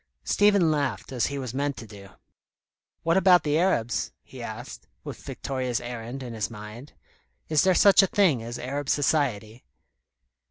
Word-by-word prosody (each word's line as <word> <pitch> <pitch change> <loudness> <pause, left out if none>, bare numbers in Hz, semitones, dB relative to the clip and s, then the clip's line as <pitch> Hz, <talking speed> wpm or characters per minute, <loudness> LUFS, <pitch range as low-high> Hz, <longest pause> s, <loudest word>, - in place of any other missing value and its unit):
Stephen 200 -5 +3
laughed, 145 -3 -2
as 125 -3 0
he 140 - -4
was 130 -4 -5
meant 140 +1 -2
to 115 - -8
do. 100 -2 -13 0.9
"What 165 +2 +2
about 180 -3 +5
the 150 +1 +1
Arabs?" 145 -11 0
he - - -12
asked, - - -8 0.2
with - - -8
Victoria's 130 -3 -3
errand 120 +2 -7
in 120 -2 -7
his 110 -1 -3
mind. 110 +5 -10 0.6
"Is 155 -2 +3
there 185 -1 +3
such 200 +1 +7
a 195 - +2
thing 180 - +2
as 120 +1 -6
Arab 140 +3 -4
society?" 125 -6 0
135 Hz, 160 wpm, -26 LUFS, 115-160 Hz, 0.9 s, such